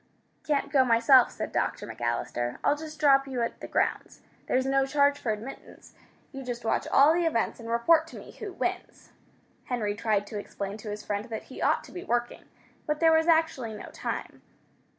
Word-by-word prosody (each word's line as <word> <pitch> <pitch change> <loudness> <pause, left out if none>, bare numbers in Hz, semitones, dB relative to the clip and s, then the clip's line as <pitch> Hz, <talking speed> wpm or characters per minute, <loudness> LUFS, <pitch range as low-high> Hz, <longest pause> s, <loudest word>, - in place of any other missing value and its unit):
"Can't 290 -2 0
go 270 -3 +5
myself," 240 +1 +5
said - - -5
Dr. - - -1
McAllister. 120 - -3
"I'll 290 - +3
just 310 0 -9
drop 275 -2 +5
you 255 -3 -2
at 230 - -4
the - - -6
grounds. - - -1 0.3
There's 260 +1 +1
no 270 0 +2
charge 285 0 +3
for 235 - -1
admittance. 220 +6 -9 0.4
You 270 - -7
just 240 -2 -5
watch - - 0
all 285 +3 +6
the 340 0 +1
events 230 -7 -1
and 230 0 -8
report 320 +8 +3
to - - -11
me - - -11
who 420 -3 -7
wins." - - -4 0.5
Henry 220 -5 -1
tried 210 -1 0
to 205 0 -6
explain 200 0 -6
to 215 0 -8
his 210 0 -6
friend 205 +1 -2
that 225 -3 -6
he - - -8
ought - - +2
to - - -14
be 360 - -7
working, 240 0 -2 0.4
but 300 0 -1
there 325 -1 +5
was 320 +1 +3
actually 320 -9 +2
no 210 - -9
time. - - -5
255 Hz, 195 wpm, -28 LUFS, 225-295 Hz, 0.5 s, all